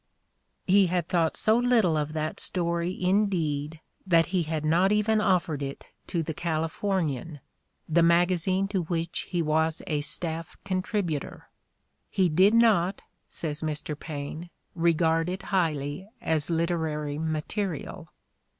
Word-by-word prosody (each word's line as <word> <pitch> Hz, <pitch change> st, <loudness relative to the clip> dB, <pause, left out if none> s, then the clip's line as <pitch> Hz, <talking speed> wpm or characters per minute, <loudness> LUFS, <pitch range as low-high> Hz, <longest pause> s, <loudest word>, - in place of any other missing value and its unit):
" -, -, -48 dB, 0.2 s
He 195 Hz, 0 st, +5 dB
had 175 Hz, -1 st, -1 dB
thought 165 Hz, -3 st, +1 dB
so 220 Hz, 0 st, +3 dB
little 235 Hz, -9 st, +3 dB
of 150 Hz, 0 st, -2 dB
that 155 Hz, 0 st, -3 dB
story 170 Hz, 0 st, -1 dB
indeed 165 Hz, -6 st, 0 dB, 0.3 s
that 165 Hz, -2 st, +5 dB
he 185 Hz, -, +3 dB
had 155 Hz, -1 st, -3 dB
not 175 Hz, +5 st, +3 dB
even 210 Hz, +1 st, +2 dB
offered 175 Hz, -7 st, +1 dB
it 140 Hz, 0 st, -6 dB, 0.2 s
to 170 Hz, -3 st, -1 dB
The 160 Hz, -, -4 dB
Calif 160 Hz, 0 st, -2 dB
ornian, 165 Hz, -7 st, -1 dB, 0.5 s
the 170 Hz, +1 st, +3 dB
magazine 175 Hz, +3 st, +3 dB
to 195 Hz, -3 st, 0 dB
which 165 Hz, 0 st, -3 dB
he 175 Hz, -3 st, 0 dB
was 160 Hz, +1 st, +1 dB
a 150 Hz, -2 st, -1 dB
staff 165 Hz, +2 st, -2 dB
contributor: 185 Hz, -5 st, -3 dB, 0.6 s
"he 185 Hz, -2 st, +2 dB
did 190 Hz, +7 st, +4 dB
not," 205 Hz, -5 st, +3 dB, 0.3 s
says 150 Hz, -2 st, -3 dB
Mr. 155 Hz, -1 st, -3 dB
Paine, 155 Hz, +2 st, -6 dB, 0.2 s
"regard 165 Hz, 0 st, +2 dB
it 185 Hz, +1 st, -4 dB
highly 155 Hz, 0 st, -1 dB
as 155 Hz, -1 st, 0 dB
literary 160 Hz, -3 st, -1 dB
material." 160 Hz, +2 st, -3 dB
170 Hz, 135 wpm, -27 LUFS, 155-185 Hz, 0.6 s, He